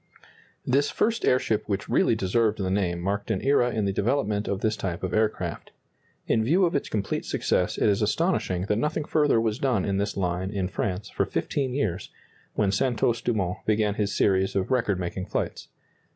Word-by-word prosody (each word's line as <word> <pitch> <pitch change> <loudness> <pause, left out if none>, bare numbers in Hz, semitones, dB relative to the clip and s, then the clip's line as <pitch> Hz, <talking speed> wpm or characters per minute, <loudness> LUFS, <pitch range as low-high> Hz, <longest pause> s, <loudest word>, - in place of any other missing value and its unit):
This 140 +3 +2
first 230 +1 0
airship 115 -5 +1
which 100 0 -2
really - - +3
deserved 110 +2 +1
the 95 -2 -1
name 90 -3 0
marked 100 +4 -2
an 105 -4 0
era 135 -3 +3
in 110 -4 -1
the 100 - 0
development 105 -1 0
of 100 -1 -2
this 110 -1 +1
type 90 -5 -4
of 90 -1 -2
aircraft. 110 +1 -1 0.5
In 110 - +2
view 175 +11 +3
of 170 - 0
its 140 - -1
complete 105 -2 -2
success - - 0
it - - +2
is 100 0 +2
astonishing 105 - 0
that 105 +1 0
nothing 150 +2 -1
further 150 -7 +3
was 110 +1 -1
done 125 -9 +1
in 100 -1 0
this 100 +1 -2
line 90 0 -1
in 95 -3 -2
France 95 0 -3
for - - 0
fifteen 130 -3 -2
years, 95 -10 -2 0.5
when 100 -2 +2
Santos 115 +2 +1
Dumont 100 -7 -1
began 105 -1 +2
his 105 0 -1
series 95 0 +2
of 95 +5 -1
record 110 -7 +1
making 90 +1 -4
flights. - - -3
105 Hz, 190 wpm, -26 LUFS, 95-120 Hz, 0.5 s, really